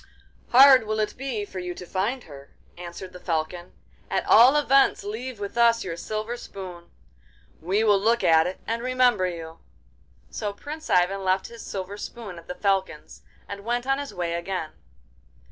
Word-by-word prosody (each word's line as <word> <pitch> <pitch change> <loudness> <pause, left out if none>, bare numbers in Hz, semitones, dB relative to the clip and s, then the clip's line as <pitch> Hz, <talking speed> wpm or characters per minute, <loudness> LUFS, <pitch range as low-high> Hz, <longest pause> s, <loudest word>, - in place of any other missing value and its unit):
'Hard 260 -2 +8
will 215 0 -1
it 215 - -1
be 250 -6 -4
for 190 -2 -7
you 180 -1 -5
to 180 - -9
find 210 +9 -2
her,' 140 -2 -13 0.3
answered 180 +1 -9
the 180 - -10
Falcon. 175 +1 -3 0.4
'At - - -1
all 250 +5 +7
events 275 -2 +3
leave 225 +3 -6
with 205 +3 -4
us 235 0 +4
your 170 -3 -4
silver 215 +6 -4
spoon. 180 -6 -9 0.7
We 190 +6 +1
will 205 -3 +4
look 230 +4 +2
at 160 0 +5
it 185 - -6
and 230 +1 -2
remember 250 -6 +2
you.' 165 -2 -7 0.7
So 210 -2 -4
Prince 300 +8 -8
Ivan 185 +2 +2
left 190 0 0
his 235 -1 -11
silver 195 +1 -6
spoon 205 -4 -8
at 165 - -17
the 180 - -5
Falcon's, 190 -6 -2 0.3
and 200 0 -7
went 240 +2 -1
on 270 +1 +1
his 285 -1 -5
way 175 -2 -3
again. 170 -2 -3
200 Hz, 175 wpm, -25 LUFS, 180-235 Hz, 0.7 s, Hard